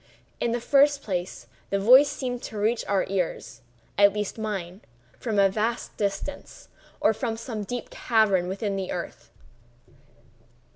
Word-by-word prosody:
In 235 - 0
the 240 - 0
first 280 +3 +3
place, 180 -2 -4 0.2
the 200 - +1
voice 255 +8 +7
seemed 250 -4 -4
to 215 - -7
reach 220 +3 +1
our 195 -1 +1
ears—at 180 - -1
least 210 +1 -3
mine—from 190 - -6
a 200 -1 +6
vast 220 +4 -2
distance, 200 +7 -4 0.3
or 220 - +3
from 225 0 -3
some 225 -1 -5
deep 245 +4 -5
cavern 210 -6 +2
within 195 +2 -2
the 190 -1 -3
earth. - - -6
210 Hz, 135 wpm, -26 LUFS, 190-235 Hz, 0.3 s, voice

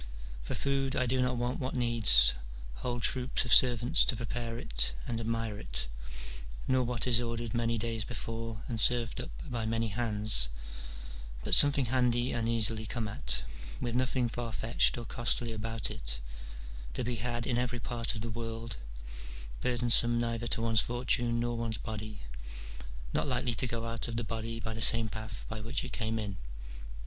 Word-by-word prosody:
For - - -4
food 135 -1 0
I 130 - +1
do 130 +1 +1
not 125 0 +1
want 120 +2 -2
what 130 0 -3
needs 115 - +6 0.4
whole 120 - -3
troops 125 +2 +2
of 120 - +3
servants 125 +5 +6
to 130 - +1
prepare 115 +1 -4
it - - 0
and 115 - -3
admire 115 -2 -2
it, - - -3 0.8
nor 130 0 +3
what 120 -1 -1
is 120 -2 +4
ordered 115 -1 -3
many 115 -1 0
days 115 0 -1
before 115 0 -5
and 115 -2 0
served 120 -1 +3
up - - -7 0.2
by 115 -4 -3
many 115 0 0
hands, 105 - +3 0.9
but - - +1
something 145 -2 +9
handy 120 0 +1
and 115 -1 -1
easily 110 -1 +1
come 115 -2 -2
at, 65 -10 -2 0.4
with 120 - -3
nothing 125 0 +1
far 120 0 -4
fetched 115 +2 +1
or 120 - -5
costly 120 0 -1
about 115 +1 -3
it, - - -4 0.8
to - - -1
be 120 0 -2
had 120 +1 -2
in 120 -2 0
every 125 -1 -2
part 115 0 -3
of 110 - -5
the 115 - -4
world, 115 0 -5 0.8
burdensome 120 -1 +3
neither 115 0 -2
to 115 -1 -1
one's 115 -1 +3
fortune 120 -1 0
nor 120 0 -1
one's 115 -1 -2
body, 110 -1 -6 0.9
not - - 0
likely 125 -2 0
to 130 - 0
go 115 -1 -3
out 115 +1 -3
of 115 - -5
the 120 - -1
body 115 +1 -4
by 110 0 -4
the 110 - -6
same 115 -1 +4
path 110 0 -7
by 110 -1 -5
which 115 +5 -2
it 130 -2 -7
came 110 -1 -2
in. 100 -3 -4
115 Hz, 175 wpm, -31 LUFS, 110-120 Hz, 0.9 s, something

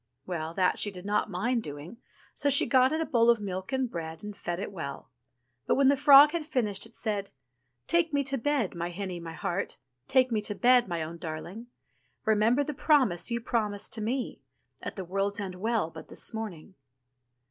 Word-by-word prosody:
Well, 165 -2 -4
that 185 -2 +2
she 205 - 0
did 185 -2 -10
not 210 +1 0
mind 230 +6 0
doing, 150 +6 -8 0.4
so 285 - +1
she 280 - +4
got 260 0 +4
it 315 +1 0
a - - 0
bowl 235 -5 +3
of 235 -2 +5
milk 190 -2 -5
and 265 -1 0
bread, 165 -5 -6
and 210 -1 -6
fed 175 -2 -4
it 200 - -4
well. 155 -9 -7 0.6
But - - +3
when 275 -1 +5
the 280 - +5
frog 285 +1 +8
had 340 - -1
finished, 225 - -1
it 225 - -20
said: 205 -3 -2
/'^^ - - -22
^"^^^ - - -33 0.5
"Take 340 -1 +2
me 285 -1 +1
to 270 -1 0
bed, 270 -5 0
my 170 0 -3
hinny, 180 0 -5
my 165 -1 -7
heart, 195 +2 -3 0.3
Take 255 -2 +3
me 215 -2 +1
to 205 0 -2
bed, 250 0 +4
my 170 -3 -2
own 165 +2 -7
darhng; 175 +8 -6 0.6
Remember 220 +5 +3
the 300 - -4
promise 265 - +2
you 235 0 -2
promised 215 -4 -2
to 225 - 0
me. 245 +4 -3 0.4
At - - -6
the 190 -3 -5
World's 195 +3 -1
End 195 -2 -4
Well 210 -2 -1
but - - -10
this - - -3
morning.' 205 -5 -6
210 Hz, 210 wpm, -29 LUFS, 180-255 Hz, 0.6 s, frog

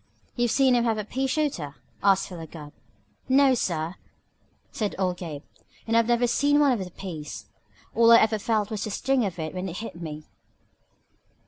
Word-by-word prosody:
"You've 240 -1 +1
seen 265 +1 +4
him 240 -1 +3
have 225 -2 +1
a 210 - -3
pea 265 +5 -2
shooter?" 260 - -2 0.3
asked 195 -1 +3
Philo 170 -4 -8
Gubb. 150 -2 -11 0.6
"No, 270 0 +5
sir!" 170 -6 -2 0.7
said 210 -3 -2
old 185 -2 0
Gabe. 155 -5 -7 0.4
"And 225 - 0
I 230 - +7
never 240 +1 +2
seen 285 +4 +3
one 290 -2 +5
of 225 -6 0
the 180 - -8
peas. 165 -5 -7 0.5
All 230 0 +5
I 230 - +10
ever 220 -1 +3
felt 215 -1 0
was 215 -2 -3
the - - -4
sting 260 +4 +1
of 185 -3 -4
it 155 -2 -4
when 185 +1 -4
it 175 - -6
hit 215 -6 -7
me." 155 -2 -6
210 Hz, 190 wpm, -26 LUFS, 170-240 Hz, 0.7 s, I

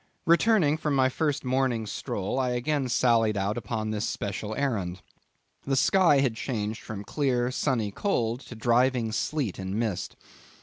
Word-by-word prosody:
Returning 170 -3 +4
from 150 -3 -1
my 130 -1 +4
first 145 +1 -1
morning 125 -3 0
stroll, 100 +2 -3
I 125 -1 0
again 130 +2 -1
sallied 115 -3 +3
out 100 +2 0
upon 110 -1 -3
this 105 -1 -1
special 105 +1 -4
errand. 100 - -2 0.6
The 135 - +1
sky 165 0 +4
had 130 -4 +1
changed 110 -3 -3
from 105 -2 -7
clear, 125 0 0
sunny 125 -6 0
cold, 120 - -1
to 120 - -9
driving 120 0 +2
sleet 125 - -2
and 95 +1 -4
mist. 110 -5 -2
120 Hz, 150 wpm, -27 LUFS, 110-135 Hz, 0.6 s, Returning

